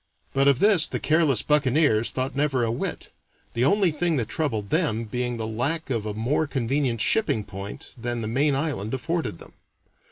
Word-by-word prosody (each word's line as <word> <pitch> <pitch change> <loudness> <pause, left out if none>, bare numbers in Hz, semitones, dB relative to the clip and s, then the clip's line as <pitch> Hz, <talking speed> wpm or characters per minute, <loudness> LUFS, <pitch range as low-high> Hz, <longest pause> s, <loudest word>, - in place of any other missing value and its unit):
But 135 +1 +3
of 140 -3 +5
this 200 -2 +5
the - - -3
careless 155 -7 +2
buccaneers 140 -5 +2
thought 130 +2 -3
never 140 -3 +1
a 115 - 0
whit, 120 - -4 0.4
the 120 - 0
only 195 +1 +3
thing 165 +2 0
that 120 -5 -2
troubled 115 -9 -2
them 110 +1 +1
being 120 +2 -3
the 110 - -3
lack 135 +8 -2
of 110 -3 -2
a 105 - -3
more 130 +8 0
convenient 130 -3 -1
shipping 115 - +2
point 100 0 -8
than 120 -1 -3
the - - -2
main 140 +5 +1
island 135 -6 -2
afforded 130 - -2
them. - - -15
130 Hz, 185 wpm, -25 LUFS, 115-150 Hz, 0.4 s, of